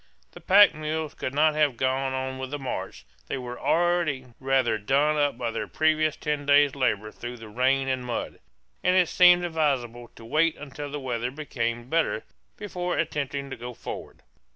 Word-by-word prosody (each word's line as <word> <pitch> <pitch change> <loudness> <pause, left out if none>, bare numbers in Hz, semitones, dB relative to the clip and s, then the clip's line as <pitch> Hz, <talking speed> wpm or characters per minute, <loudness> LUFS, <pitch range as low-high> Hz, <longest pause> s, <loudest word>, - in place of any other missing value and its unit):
The - - -13
pack 205 +2 +7
mules 155 0 -3
could 130 - -5
not 155 +1 +4
have 150 -5 +1
gone 130 +1 0
on 130 0 -3
with 130 0 -5
the 145 - -3
march; 135 -3 -5 0.2
they - - -3
were 125 -1 -7
already 170 -6 +1
rather 130 -4 +1
done 140 +8 +2
up 145 -4 +1
by 120 -2 -2
their - - -4
previous 155 -1 +1
ten 150 -1 -2
days' 145 -1 +5
labor 110 -6 0
through 120 +2 -7
rain 130 +4 +1
and 130 -1 -1
mud, 120 -2 -4 0.4
and 180 0 +3
it 180 -3 +4
seemed 180 -1 +6
advisable 135 -8 -1
to 115 - -13
wait 155 +7 +2
until 145 0 -7
the 145 +1 -5
weather 125 -2 -2
became 120 -4 -3
better 160 -6 0 0.3
before 180 -4 -3
attempting 140 -3 -2
to - - -3
go 120 0 -8
forward. - - -8
140 Hz, 175 wpm, -26 LUFS, 125-155 Hz, 0.4 s, pack